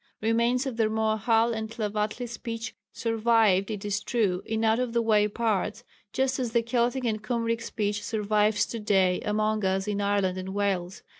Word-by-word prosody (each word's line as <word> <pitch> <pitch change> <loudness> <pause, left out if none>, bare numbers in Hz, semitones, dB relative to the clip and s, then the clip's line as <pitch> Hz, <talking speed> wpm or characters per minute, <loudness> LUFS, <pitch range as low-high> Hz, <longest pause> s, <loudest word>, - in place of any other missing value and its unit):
Remains 235 +4 +1
of 260 -4 -4
the 225 - +3
Rmoahal 220 +1 +2
and 220 -1 -4
Tlavatli 215 +1 -2
speech 230 -1 -6 0.2
survived 225 -4 +2
it 210 -2 -5
is 205 0 -1
true 200 -6 0
in 220 0 -1
out 220 +1 +3
of 250 -2 -2
the 235 - +2
way 210 -2 +3
parts, 215 0 -1 0.3
just 265 0 0
as 240 -3 -2
the 235 -1 +3
Keltic 245 +2 0
and 215 -2 -1
Cymric 230 +1 -1
speech 205 -1 -2
survives 210 0 +1
to 230 - -6
day 190 -4 +2
among 215 0 0
us 190 +1 0
in 205 -1 -1
Ireland 200 -2 +1
and 190 +1 -6
Wales. 190 -2 -1
220 Hz, 175 wpm, -27 LUFS, 205-230 Hz, 0.3 s, the